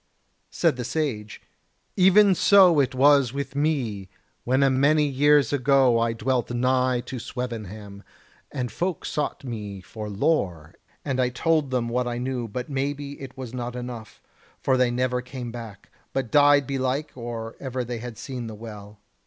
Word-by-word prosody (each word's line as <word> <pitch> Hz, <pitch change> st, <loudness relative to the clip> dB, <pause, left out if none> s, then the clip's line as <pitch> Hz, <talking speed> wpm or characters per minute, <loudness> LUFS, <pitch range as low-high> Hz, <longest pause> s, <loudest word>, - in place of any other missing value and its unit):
Said -, -, +1 dB
the 125 Hz, -, -3 dB
Sage: 115 Hz, -7 st, -3 dB, 0.5 s
"Even 190 Hz, +2 st, +6 dB
so 185 Hz, -3 st, +6 dB
it 135 Hz, -2 st, +1 dB
was 140 Hz, -2 st, +5 dB
with 140 Hz, -1 st, -5 dB
me, 125 Hz, -10 st, -1 dB, 0.4 s
when 130 Hz, +3 st, +2 dB
a 135 Hz, -, +5 dB
many 145 Hz, +3 st, +3 dB
years 145 Hz, +1 st, +3 dB
ago 135 Hz, -3 st, +4 dB
I 115 Hz, 0 st, +1 dB
dwelt 125 Hz, +2 st, -1 dB
nigh 125 Hz, 0 st, +1 dB
to 125 Hz, +1 st, -7 dB
Swevenham, 110 Hz, -5 st, -6 dB, 0.5 s
and 125 Hz, -2 st, -3 dB
folk 175 Hz, -2 st, -3 dB
sought 150 Hz, -, -2 dB
to 135 Hz, -, -10 dB
me 105 Hz, -4 st, -6 dB
for 105 Hz, +3 st, -8 dB
lore, 95 Hz, -, -1 dB, 0.3 s
and 135 Hz, -3 st, -1 dB
I 125 Hz, -, +2 dB
told 155 Hz, +3 st, +1 dB
them 125 Hz, -2 st, -1 dB
what 125 Hz, +1 st, -1 dB
I 120 Hz, 0 st, -3 dB
knew; 125 Hz, -1 st, -3 dB
but 125 Hz, +4 st, -5 dB
maybe 140 Hz, +1 st, -4 dB
it 135 Hz, -1 st, -9 dB
was 125 Hz, -3 st, -7 dB
not 125 Hz, -1 st, -4 dB
enough, 120 Hz, -3 st, -8 dB, 0.4 s
for 130 Hz, -, +2 dB
they 125 Hz, -1 st, +3 dB
never 125 Hz, +1 st, 0 dB
came 125 Hz, -1 st, -7 dB
back; 115 Hz, -4 st, -10 dB, 0.2 s
but 130 Hz, -4 st, -2 dB
died 145 Hz, -1 st, +5 dB
belike 135 Hz, +2 st, -2 dB
or 115 Hz, -2 st, -6 dB
ever 130 Hz, -2 st, -3 dB
they 120 Hz, -1 st, -5 dB
had 120 Hz, -1 st, -8 dB
seen 125 Hz, -4 st, -6 dB
the 110 Hz, -, -7 dB
Well. 105 Hz, -1 st, -10 dB
125 Hz, 170 wpm, -25 LUFS, 115-140 Hz, 0.5 s, Even